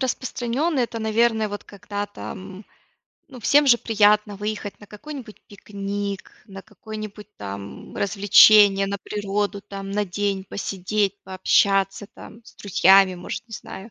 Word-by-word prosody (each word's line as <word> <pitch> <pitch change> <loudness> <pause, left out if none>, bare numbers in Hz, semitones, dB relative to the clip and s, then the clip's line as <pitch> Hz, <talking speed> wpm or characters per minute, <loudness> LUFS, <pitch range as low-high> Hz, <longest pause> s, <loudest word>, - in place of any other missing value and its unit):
распространенный 260 +3 -1
это, 230 -1 -4
наверно, 220 0 +1
вот 205 0 -6
когда 205 0 -6
там, 195 0 -9 0.6
ну 255 -3 -12
всем 290 +6 +4
же 245 -3 +7
приятно 210 -2 +2
выехать 210 0 -5
на 205 - -13
какой-нибудь 235 +2 -10
пикник, 200 -1 -6
на 195 -1 -10
какое-нибудь 215 0 -9
там 100 0 -8
развлечение, 200 0 +6
на 200 +1 -3
природу, 205 0 -3
там, 195 -1 -8
на 205 0 -1
день 195 +1 -2
посидеть, 200 +1 -2
пообщаться 195 +1 +1
там 230 +2 -13
с - - -17
друзьями 195 -1 +4
может, 175 +6 -7
не 225 - -17
знаю. 200 0 -9
205 Hz, 135 wpm, -23 LUFS, 195-220 Hz, 0.6 s, же